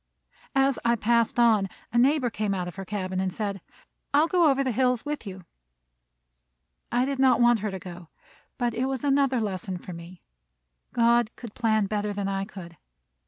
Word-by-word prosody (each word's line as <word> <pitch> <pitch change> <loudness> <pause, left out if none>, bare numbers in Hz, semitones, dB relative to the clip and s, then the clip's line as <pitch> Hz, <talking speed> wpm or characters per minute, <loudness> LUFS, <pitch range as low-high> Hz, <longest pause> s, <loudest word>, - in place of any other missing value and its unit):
As 270 -1 +3
I 235 0 +3
passed 235 +1 +1
on, 220 -5 +4 0.2
a - - +1
neighbor 260 -1 +3
came 205 -2 -1
out 180 -1 -3
of 175 - -6
her 195 0 -6
cabin, 185 -2 -3
and 190 0 -1
said, 200 -1 -4 0.5
"I 290 - +6
will 320 - +3
go 345 -4 +4
over 275 0 +2
the 260 - 0
hills 250 +1 +1
with 295 -6 -4
you." 190 -1 -8 1.5
I 245 +1 +2
did 275 -1 -3
not 260 -3 +4
want 240 -1 +5
her 210 +1 -2
to 190 - -5
go, 175 -1 -10 0.5
but 240 -2 0
it 240 +3 -1
was 265 -2 -3
another 275 -2 +2
lesson 190 -3 -3
for 180 +1 -9
me. 170 +1 -11 0.7
God 235 -1 +3
could 235 -4 -10
plan 220 -3 +1
better 210 0 -2
than 200 -1 -3
I 195 0 -2
could. 170 -5 -11
225 Hz, 190 wpm, -26 LUFS, 195-250 Hz, 1.5 s, I